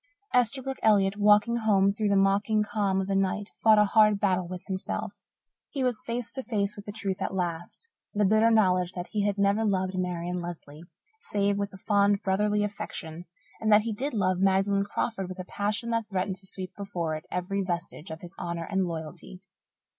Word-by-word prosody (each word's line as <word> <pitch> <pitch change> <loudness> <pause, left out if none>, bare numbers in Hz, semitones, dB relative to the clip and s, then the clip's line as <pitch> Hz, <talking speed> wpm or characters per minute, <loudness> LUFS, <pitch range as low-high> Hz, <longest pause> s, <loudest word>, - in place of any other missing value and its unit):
Esterbrook 260 +2 +1
Elliott, 200 -3 +4
walking 210 +3 +4
home 200 -3 +3
through 215 0 -1
the 200 - +3
mocking 200 +2 +3
calm 205 -2 0
of 190 - -1
the 195 0 -1
night, 195 +2 0
fought 220 -1 +6
a 210 - +6
hard 210 0 +4
battle 185 -3 +1
with 180 0 -7
himself. 190 -1 -4 0.6
He 275 -3 -2
was 250 -2 0
face 235 -1 -4
to 265 - -1
face 210 -4 -1
with 205 - -10
the 205 - -5
truth 200 -2 -4
at 190 - -2
last 175 - -4 0.2
the 205 0 +1
bitter 215 +3 +4
knowledge 185 -5 +3
that 175 0 -6
he 205 -1 0
had 205 0 -1
never 200 +2 +2
loved 190 -3 0
Marian 180 0 -2
Lesley, 165 -3 -8 0.4
save 200 - 0
with 200 0 -2
a 190 - -11
fond, 200 0 +2
brotherly 210 +2 +1
affection, 175 -5 -5 0.3
and 220 0 +1
that 210 0 +6
he 230 -1 -2
did 260 +4 -3
love 185 -3 +1
Magdalen 195 +1 +2
Crawford 200 -2 -3
with 185 - -7
a 185 - -6
passion 210 +5 -2
that 230 -1 -1
threatened 190 -1 -2
to 190 0 -4
sweep 185 -1 -6
before 180 -6 -3
it 155 - -8
every 185 +2 -2
vestige 170 -2 -4
of 160 0 -7
his 175 -2 -9
honour 170 -1 -3
and 190 -2 +1
loyalty. 170 +3 -7
200 Hz, 200 wpm, -27 LUFS, 185-210 Hz, 0.6 s, fought